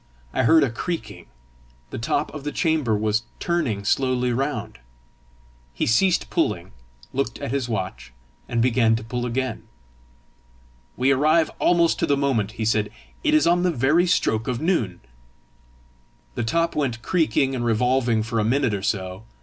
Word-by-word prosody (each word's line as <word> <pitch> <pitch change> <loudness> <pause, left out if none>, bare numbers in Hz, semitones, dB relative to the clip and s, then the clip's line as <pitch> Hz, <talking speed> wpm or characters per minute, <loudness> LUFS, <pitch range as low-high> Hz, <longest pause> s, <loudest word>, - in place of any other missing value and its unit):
I - - +1
heard 160 +4 +6
a 130 - 0
creaking: 110 - -5 0.6
the - - -5
top 145 +6 -1
of 150 -2 -7
the 145 - -3
chamber 150 -11 +1
was 110 +1 +1 0.2
turning 125 - -1
slowly 125 +1 +1
round. 135 +4 -3 1.0
He - - 0
ceased 180 +11 +2
pulling, - - -1 0.4
looked 130 -3 -2
at 140 - -5
his 135 -3 -1
watch, 95 - -4 0.4
and 115 -1 +1
began 115 -2 +3
to 110 - -4
pull 120 +2 -3
again. 130 0 -3 1.3
"We 130 +2 +3
arrive 155 +4 +3
almost 170 -1 +3
to 165 - +1
the 140 -2 +2
moment!" 120 -7 0
he 110 - -3
said; 105 -1 +1 0.3
"it 305 -1 +3
is 310 - +4
on 175 +1 +3
the 180 - +2
very 155 +4 +2
stroke 110 -10 +1
of 125 -2 -1
noon!" 130 - -1 1.3
The 120 - -2
top 165 +8 0
went 125 -6 -2
creaking 140 -6 +1
and 125 -2 -2
revolving 120 0 +1
for 115 0 -2
a - - +2
minute 125 +1 +1
or 100 - -2
so. 95 0 -3
125 Hz, 160 wpm, -23 LUFS, 110-150 Hz, 1.3 s, heard